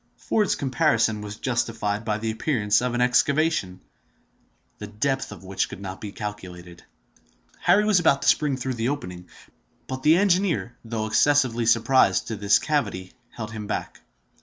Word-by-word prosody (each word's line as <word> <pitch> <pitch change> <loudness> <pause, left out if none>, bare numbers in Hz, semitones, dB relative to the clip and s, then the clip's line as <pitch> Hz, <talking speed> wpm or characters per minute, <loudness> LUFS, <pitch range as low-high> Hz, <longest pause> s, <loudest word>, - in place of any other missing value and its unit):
Ford's 210 -3 0
comparison 115 -5 +1
was 105 0 -7
justified 115 -3 -2
by 105 -2 -1
the 110 0 -2
appearance 110 -3 +1
of 125 -1 -2
an 120 - 0
excavation, 125 - +1 1.0
the 105 - -6
depth 135 +6 -2
of 95 -4 -11
which 95 0 -2
could - - -9
not 95 -1 -7
be 105 - -6
calculated. 90 -5 -8 0.8
Harry 180 +5 +3
was 210 -4 +4
about 140 -5 +2
to - - -2
spring 145 -3 +2
through 130 0 -3
the 120 +1 -1
opening; 90 -11 -6 0.6
but 130 +1 -6
the 155 +4 +5
engineer, 180 - +1
though 110 -1 -3
excessively 120 0 +2
surprised 115 -5 +3
to 115 - -5
find 105 - -7
this 100 0 +4
cavity, 100 -11 -2 0.2
held 110 -2 -7
him 110 -2 -7
back. - - -5
115 Hz, 160 wpm, -24 LUFS, 105-140 Hz, 1.0 s, the